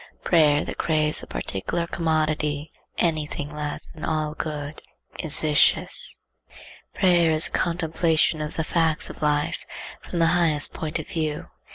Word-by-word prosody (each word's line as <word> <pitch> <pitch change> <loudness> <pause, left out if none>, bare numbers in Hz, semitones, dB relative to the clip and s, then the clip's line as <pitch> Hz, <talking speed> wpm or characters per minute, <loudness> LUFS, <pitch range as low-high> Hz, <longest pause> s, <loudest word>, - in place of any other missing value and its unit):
Prayer 150 -4 +3
that - - -7
craves 155 -2 +2
a - - -10
particular 135 - -3
commodity, 155 -3 -1 0.3
any 155 -3 0
thing 145 0 -6
less 150 -1 -5
than 155 - -12
all 155 -1 -1
good, 150 -1 -6 0.4
is 155 -2 +2
vicious. 150 -1 +2 0.7
Prayer 175 -3 +4
is 155 +1 +6
the - - -1
contemplation 165 -2 +1
of 150 0 -5
the 160 - -1
facts 160 -1 +2
of - - -14
life 150 0 0 0.4
from - - -6
the 165 - +3
highest 160 -4 +2
point 155 0 -3
of 160 - -6
view. 155 -2 -3
155 Hz, 150 wpm, -24 LUFS, 150-165 Hz, 0.7 s, is